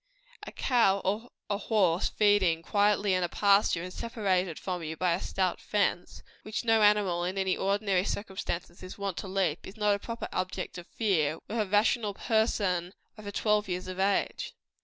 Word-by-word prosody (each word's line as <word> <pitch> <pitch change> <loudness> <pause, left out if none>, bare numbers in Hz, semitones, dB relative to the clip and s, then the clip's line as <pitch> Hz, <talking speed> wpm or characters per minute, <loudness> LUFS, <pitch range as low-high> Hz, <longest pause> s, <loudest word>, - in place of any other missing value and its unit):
A - - -6
cow 230 -7 +2
or 215 +6 -1 0.2
a 205 -1 -1
horse 190 -6 +2
feeding 195 -6 +3
quietly 205 +1 +2
in 185 - +1
a 175 - 0
pasture, 200 -4 +3
and 180 0 -7
separated 190 -7 -1
from 180 -2 -4
you 160 0 -5
by 180 0 +2
a 175 - -2
stout 185 -2 -1
fence, 200 -4 -1 0.2
which 215 +2 -4
no 225 -1 +4
animal 205 -4 +3
in 185 +2 -3
any 190 -1 +1
ordinary 195 -1 +1
circumstances 190 -4 -4
is 185 - -9
wont 200 -2 -3
to - - -5
leap, 185 -4 -1
is 195 - -11
not 210 -1 +3
a 200 - -1
proper 230 +2 -5
object 185 0 -3
of 175 - -12
fear 165 -9 0
with 225 +2 -3
a 210 - 0
rational 210 +1 +2
person 200 -6 0 0.2
over 210 -2 -8
twelve 210 0 +1
years 180 0 -3
of 185 0 -6
age. 195 +1 0
195 Hz, 180 wpm, -29 LUFS, 180-210 Hz, 0.2 s, no